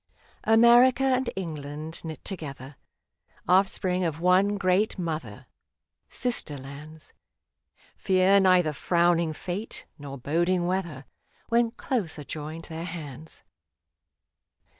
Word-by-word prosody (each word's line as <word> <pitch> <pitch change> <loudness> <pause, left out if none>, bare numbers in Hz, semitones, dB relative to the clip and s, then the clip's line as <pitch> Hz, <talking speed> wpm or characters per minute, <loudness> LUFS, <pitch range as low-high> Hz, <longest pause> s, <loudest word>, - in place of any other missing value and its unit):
55. - - -39
TO - - -12
ENGLAND 225 - +6
America 245 +2 +6
and 260 -2 +2
England 155 -3 -6
knit 160 -1 -8
together 145 -7 -6 0.4
— - - -58 0.3
Offspring 185 0 +2
of 160 -3 -2
one 185 +4 +3
great 195 +3 +1
Mother, 165 -3 -5 0.6
Sister 240 - -2
Lands 145 +4 -11 0.4
— - - -33
Fear 190 +1 +4
neither 180 -5 +4
frowning 170 +3 +2
fate 185 +7 -5
nor 140 -1 -7
boding 175 +7 0
weather, 170 -7 -3 0.4
When 235 0 +3
close 225 -8 -3
are 150 - -7
joined 155 +3 -7
their 165 0 -6
hands. 160 -3 -8
175 Hz, 120 wpm, -26 LUFS, 155-195 Hz, 0.6 s, ENGLAND